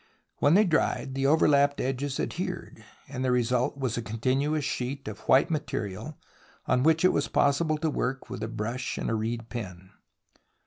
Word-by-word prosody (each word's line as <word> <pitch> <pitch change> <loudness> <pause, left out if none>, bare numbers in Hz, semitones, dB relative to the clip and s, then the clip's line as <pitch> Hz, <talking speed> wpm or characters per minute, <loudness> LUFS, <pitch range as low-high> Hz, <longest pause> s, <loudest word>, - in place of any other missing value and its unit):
When 145 +4 +4
they 210 - +6
dried, 160 -6 0
the 135 0 +1
over 155 +3 +4
lapped 140 -1 +3
edges 135 +1 -2
adhered, - - -4 0.2
and 130 -1 -4
the 130 - +1
result 125 +2 +1
was 130 -4 -2
a - - -1
con 110 0 -6
tinuous 140 +6 +1
sheet 135 -1 -3
of 110 -1 -6
white 140 +6 +5
material 145 - -4 0.5
on 125 - +2
which 160 +4 +3
it 185 - +5
was 145 - 0
possible 155 +2 +2
to 160 +1 -1
work 130 -1 -2
with 125 -3 -7
a 110 - -2
brush 115 +3 -4
and - - -2
a - - 0
reed 115 +1 -3
pen. 95 -5 -7
130 Hz, 185 wpm, -27 LUFS, 115-145 Hz, 0.5 s, they